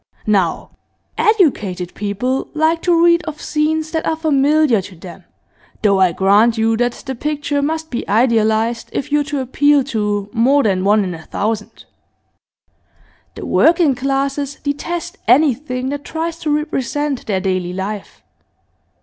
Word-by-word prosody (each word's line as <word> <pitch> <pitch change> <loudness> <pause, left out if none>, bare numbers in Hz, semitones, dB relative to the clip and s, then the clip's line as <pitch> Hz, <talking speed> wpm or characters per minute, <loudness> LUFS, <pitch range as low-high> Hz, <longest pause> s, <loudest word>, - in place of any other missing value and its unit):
Now, 195 -6 0 0.4
educated 210 - +1
people 210 +6 -2
like 320 +2 +1
to 340 -1 +3
read 340 0 +4
of 305 -1 -6
scenes 310 +1 -1
that 320 -1 -1
are 320 - 0
familiar 300 -5 +2
to 185 0 -12
them, 175 +1 -12 0.6
though 200 -2 +3
I 185 -2 +4
grant 205 +6 +3
you 225 0 +2
that 245 0 0
the 265 - -3
picture 290 +2 -2
must 320 +2 -3
be 240 - -4
idealised 225 0 +1
if 280 - -4
you're 295 0 +2
to 285 -2 -3
appeal 285 +2 +2
to 205 -2 -1
more 265 +5 +3
than 190 -3 +1
one 205 +1 +3
in 180 -2 -4
a 165 - -9
thousand. 215 0 -4 1.5
The - - -7
working 330 -3 +3
classes 275 +2 -2
detest 345 +5 -4
anything 260 0 +2
that 285 0 -4
tries 330 +1 -4
to 310 - -3
represent 295 -2 -2
their 195 -3 0
daily 185 -2 -2
life. 195 +2 -6
265 Hz, 145 wpm, -18 LUFS, 210-300 Hz, 1.5 s, read